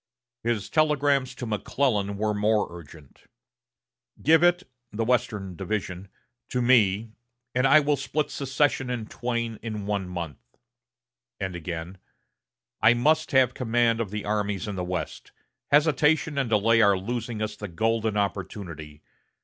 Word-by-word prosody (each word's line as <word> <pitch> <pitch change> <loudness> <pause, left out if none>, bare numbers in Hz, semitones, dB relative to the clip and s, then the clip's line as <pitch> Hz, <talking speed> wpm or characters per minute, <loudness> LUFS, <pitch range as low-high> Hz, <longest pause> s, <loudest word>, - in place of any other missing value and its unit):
His 115 -3 -1
telegrams 145 -4 +2
to 125 - -6
McClellan 105 -2 -1
were 105 +1 0
more 105 +1 +2
urgent. 75 -4 -14 0.9
"Give 160 +2 +5
it 175 +1 +4 0.3
[the 110 +2 -2
Western 110 -6 -1
Division] 95 -1 -4 0.4
to 125 - -1
me, 115 -3 +3 0.4
and 125 +2 +3
I 155 +3 +7
will 145 0 +2
split 145 +3 -2
secession 135 -1 0
in 120 -3 -3
twain 115 -1 -3
in 110 -3 -5
one 100 -3 -2
month." 85 -6 -5 1.0
And 95 -3 -3
again: 85 +2 -6 0.8
"I 110 +2 +6
must 155 +6 +2
have 130 -2 +4
command 115 -1 +1
of 110 - -3
the 105 +1 -5
armies 105 -1 -1
in 105 - -4
the 90 - -3
West. 90 0 -5 0.4
Hesitation 150 +1 +3
and 130 -4 -1
delay 115 +1 +4
are 100 -2 +5
losing 115 +3 -4
us 110 0 -3
the 105 0 -6
golden 110 +4 0
opportunity. 85 -6 -4
110 Hz, 140 wpm, -26 LUFS, 100-130 Hz, 1.0 s, I